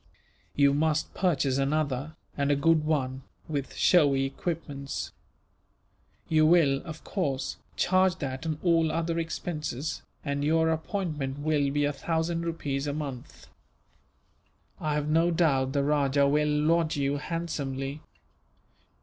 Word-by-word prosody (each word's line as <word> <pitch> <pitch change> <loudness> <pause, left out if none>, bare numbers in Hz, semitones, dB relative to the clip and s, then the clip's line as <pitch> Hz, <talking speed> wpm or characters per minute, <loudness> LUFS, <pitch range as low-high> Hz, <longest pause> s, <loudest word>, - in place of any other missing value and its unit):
"You 140 -1 +4
must 155 +1 0
purchase 140 -7 +1
another, 145 +1 -1 0.2
and 140 0 0
a 145 - +4
good 155 +2 +3
one, 135 -4 -1 0.3
with 145 -3 -4
showy 140 -6 +4
equipments. 140 -1 -4 1.2
You 155 -1 +3
will, 150 -5 +4
of 160 -2 -8
course, 140 -9 -2 0.2
charge 185 0 +3
that 130 -5 -5
and 155 -2 -1
all 165 -3 +3
other 165 +1 -1
expenses, 155 -3 -3 0.2
and 140 -1 -1
your 160 +2 +3
appointment 155 -5 -3
will 145 -1 +1
be 145 +1 +1
a 145 - 0
thousand 165 +3 -1
rupees 145 -4 -2
a 145 - -1
month. 140 -5 -6 1.3
I 155 -1 -1
have 150 0 -1
no 165 +3 +3
doubt 140 -6 +2
the 140 -1 +1
rajah 140 -1 +2
will 150 +1 +2
lodge 155 +2 +2
you 140 0 0
handsomely. 145 -3 -4
150 Hz, 130 wpm, -28 LUFS, 140-165 Hz, 1.3 s, You